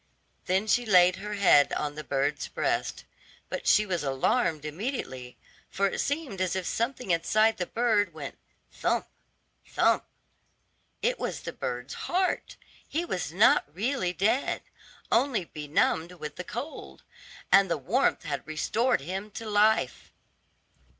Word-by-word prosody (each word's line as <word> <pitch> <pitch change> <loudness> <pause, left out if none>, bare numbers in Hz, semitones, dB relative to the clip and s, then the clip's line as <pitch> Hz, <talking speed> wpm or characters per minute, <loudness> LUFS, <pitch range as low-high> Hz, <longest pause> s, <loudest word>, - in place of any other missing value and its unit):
Then 190 +3 +1
she 245 +3 +2
laid 185 -4 +5
her 210 +1 -5
head 165 -8 +5
on 150 -1 -2
the 155 +1 -7
bird's 140 +1 -1
breast, - - -2 0.4
but - - -4
she 215 - +5
was 180 -5 -2
alarmed 150 - +1
immediately, 150 - -5 0.3
for 200 - 0
it 195 - -1
seemed 285 - -2
as 185 0 0
if 190 -1 -2
something 235 -1 -2
inside 215 +6 +3
the 180 - -2
bird 220 -5 +1
went 150 -3 -7 0.4
"thump, - - 0 0.6
thump." - - +2 1.0
It - - +1
was - - -3
the - - -6
bird's 125 +2 -4 0.2
heart; 370 +1 0 0.3
he 335 +4 -2
was 180 - -3
not 200 +7 +5
really 215 -2 0
dead, 205 +8 0 0.5
only 235 -5 +2
benumbed 160 +3 0
with 150 -4 -7
the 180 - -5
cold, 240 - -7 0.5
and 195 -1 +6
the 170 - +1
warmth 200 - +1
had 150 -3 -4
restored 210 - +1
him 190 +7 -5
to 225 - -6
life. 210 - +2
190 Hz, 140 wpm, -28 LUFS, 155-225 Hz, 1.0 s, and